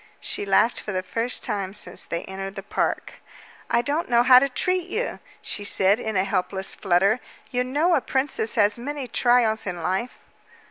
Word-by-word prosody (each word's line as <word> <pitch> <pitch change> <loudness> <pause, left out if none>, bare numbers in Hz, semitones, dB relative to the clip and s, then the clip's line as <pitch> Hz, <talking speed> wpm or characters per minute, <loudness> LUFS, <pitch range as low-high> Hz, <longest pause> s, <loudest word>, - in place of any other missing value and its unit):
She 200 - -1
laughed 210 +4 +3
for 210 - -5
the 185 -1 -2
first 230 +5 -2
time 195 -1 -3
since 180 -3 -3
they 170 - -4
entered 195 +1 -7
the 195 - -7
park. - - -3 0.5
"I 235 0 +2
don't 295 +4 -2
know 240 0 +4
how 255 0 +8
to 275 +2 0
treat 365 +6 -1
you," 470 +6 -3 0.2
she 205 - -5
said 200 +1 +3
in 220 -3 -4
a 185 - +2
helpless 190 0 -1
flutter. 195 +4 +2 0.3
"You 250 0 0
know 295 +8 +1
a 280 - +3
princess 265 -5 0
has 210 +1 +4
many 285 +2 -5
trials 240 -4 +2
in 175 -2 -4
life." 190 +7 -2
220 Hz, 185 wpm, -24 LUFS, 195-255 Hz, 0.5 s, how